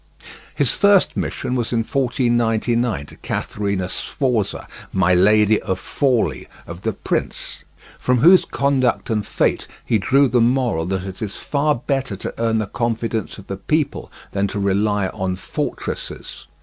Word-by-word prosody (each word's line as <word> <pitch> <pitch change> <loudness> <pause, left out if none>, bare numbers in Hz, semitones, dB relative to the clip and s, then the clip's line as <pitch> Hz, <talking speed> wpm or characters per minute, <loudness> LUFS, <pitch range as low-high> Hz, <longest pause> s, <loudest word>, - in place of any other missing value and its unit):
His - - +2
first 200 -2 +4
mission 125 - -3
was 120 -3 -1
in 115 -2 +2
1499 120 - +1
to - - -13
Catherina 100 -3 -2
Sforza, 115 0 -2 0.2
"my 90 -1 +3
lady 105 +3 +4
of 95 - -2
Forli" 115 - 0 0.2
of 85 +2 -9
The 110 +1 -1
Prince, - - -3 0.4
from 125 0 +2
whose 175 +8 +7
conduct 135 -4 0
and 105 -2 +1
fate - - 0 0.2
he 110 - +2
drew 135 +7 +4
the 120 -1 +2
moral 120 -9 +1
that 95 0 -2
it 95 -1 -8
is 105 -2 -4
far 150 +1 0
better 135 -3 -2
to 95 - -5
earn 115 -1 +1
the 110 - 0
confidence 115 +1 -2
of 100 - -11
the 95 - -5
people 150 +8 -1 0.2
than 100 0 0
to 100 - -4
rely 100 0 +1
on 95 -3 -2
fortresses. 95 - -5
115 Hz, 150 wpm, -21 LUFS, 100-125 Hz, 0.4 s, whose